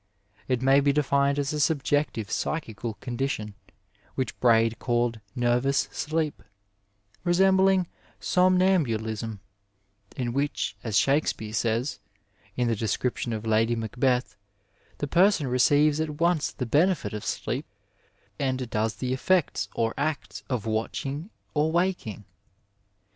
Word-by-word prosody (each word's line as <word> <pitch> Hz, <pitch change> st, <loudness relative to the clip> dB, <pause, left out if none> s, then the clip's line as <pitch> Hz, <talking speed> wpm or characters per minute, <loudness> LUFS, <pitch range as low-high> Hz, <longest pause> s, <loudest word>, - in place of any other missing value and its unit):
It 130 Hz, -1 st, 0 dB
may 135 Hz, +1 st, +5 dB
be 140 Hz, 0 st, +3 dB
defined 140 Hz, -1 st, +2 dB
as 145 Hz, +1 st, -1 dB
a 150 Hz, -, -2 dB
subjective 145 Hz, -6 st, 0 dB
psychical 115 Hz, -7 st, -3 dB
condition, 120 Hz, -4 st, -3 dB, 0.6 s
which 130 Hz, -, -2 dB
Braid 115 Hz, -2 st, +3 dB
called 120 Hz, -2 st, 0 dB, 0.2 s
nervous 125 Hz, +3 st, +1 dB
sleep, 155 Hz, 0 st, -2 dB, 0.8 s
resembling 190 Hz, +1 st, +4 dB, 0.3 s
sonmambulism, 140 Hz, -, +1 dB, 0.8 s
in 120 Hz, -2 st, -2 dB
which, 140 Hz, -5 st, -1 dB
as 110 Hz, -3 st, 0 dB
Shakespeare 135 Hz, -6 st, +1 dB
says, 115 Hz, +5 st, -1 dB, 0.6 s
in 125 Hz, -1 st, +1 dB
the 115 Hz, -, +1 dB
description 115 Hz, +3 st, -2 dB
of 110 Hz, 0 st, -4 dB
Lady 110 Hz, +1 st, +2 dB
Macbeth, 125 Hz, +3 st, 0 dB, 0.6 s
the 145 Hz, -, -3 dB
person 180 Hz, 0 st, +4 dB
receives 145 Hz, +4 st, +3 dB
at 155 Hz, -1 st, -3 dB
once 170 Hz, -2 st, +2 dB
the 125 Hz, -, -4 dB
benefit 160 Hz, -, +2 dB
of 105 Hz, -, -5 dB
sleep -, -, -3 dB, 0.7 s
and 130 Hz, -2 st, -1 dB
does 110 Hz, +1 st, 0 dB
the 130 Hz, -1 st, -2 dB
effects 135 Hz, -, +1 dB
or 115 Hz, 0 st, 0 dB
acts 140 Hz, -9 st, -2 dB
of 120 Hz, -4 st, -2 dB
watching 135 Hz, -, -3 dB, 0.2 s
or 150 Hz, +1 st, +1 dB
waking. 170 Hz, -, -1 dB
130 Hz, 120 wpm, -26 LUFS, 115-150 Hz, 0.8 s, may